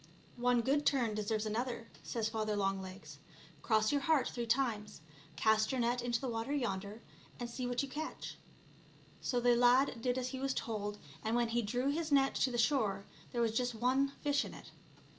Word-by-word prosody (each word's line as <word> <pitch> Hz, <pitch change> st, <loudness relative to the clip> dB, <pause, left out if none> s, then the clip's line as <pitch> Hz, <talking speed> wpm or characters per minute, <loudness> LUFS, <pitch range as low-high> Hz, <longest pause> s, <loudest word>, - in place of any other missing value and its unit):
" -, -, -27 dB
One 245 Hz, -1 st, +5 dB
good 280 Hz, +4 st, +2 dB
turn 250 Hz, -7 st, +2 dB
deserves 215 Hz, +1 st, -1 dB
another/* 230 Hz, +2 st, -2 dB
says 225 Hz, -2 st, -2 dB
Father 215 Hz, -1 st, -1 dB
Longlegs; 195 Hz, -1 st, -3 dB, 0.2 s
" -, -, -22 dB
cross 215 Hz, -2 st, +3 dB
your 285 Hz, -1 st, +1 dB
heart 305 Hz, -2 st, +3 dB
three 240 Hz, -1 st, -4 dB
times, 225 Hz, -6 st, 0 dB, 0.3 s
cast 220 Hz, +6 st, +3 dB
your 260 Hz, -, -1 dB
net 240 Hz, +1 st, +1 dB
into 240 Hz, -1 st, 0 dB
the 265 Hz, -, -3 dB
water 230 Hz, +3 st, -2 dB
yonder, 210 Hz, -5 st, -2 dB, 0.4 s
and 240 Hz, -, -3 dB
see 245 Hz, +1 st, -4 dB
what 245 Hz, +2 st, 0 dB
you -, -, -3 dB
catch. 310 Hz, +4 st, -5 dB, 0.9 s
So 245 Hz, -, 0 dB
the 245 Hz, 0 st, +4 dB
lad 245 Hz, 0 st, +4 dB
did 245 Hz, +1 st, 0 dB
as 255 Hz, 0 st, -1 dB
he 260 Hz, 0 st, -5 dB
was 270 Hz, 0 st, -1 dB
told, 210 Hz, -2 st, -3 dB, 0.2 s
and 220 Hz, +2 st, 0 dB
when 240 Hz, -1 st, +2 dB
he 235 Hz, +1 st, +1 dB
drew 245 Hz, +6 st, 0 dB
his 315 Hz, +1 st, -2 dB
net 275 Hz, -1 st, +4 dB
to 265 Hz, -, +2 dB
the 245 Hz, -, -3 dB
shore, 220 Hz, -6 st, +2 dB, 0.3 s
there 240 Hz, -, -1 dB
was 225 Hz, -1 st, +1 dB
just 245 Hz, 0 st, 0 dB
one 255 Hz, +4 st, +2 dB, 0.2 s
fish 285 Hz, -1 st, +2 dB
in -, -, -8 dB
it. -, -, -12 dB
240 Hz, 200 wpm, -34 LUFS, 220-260 Hz, 0.9 s, One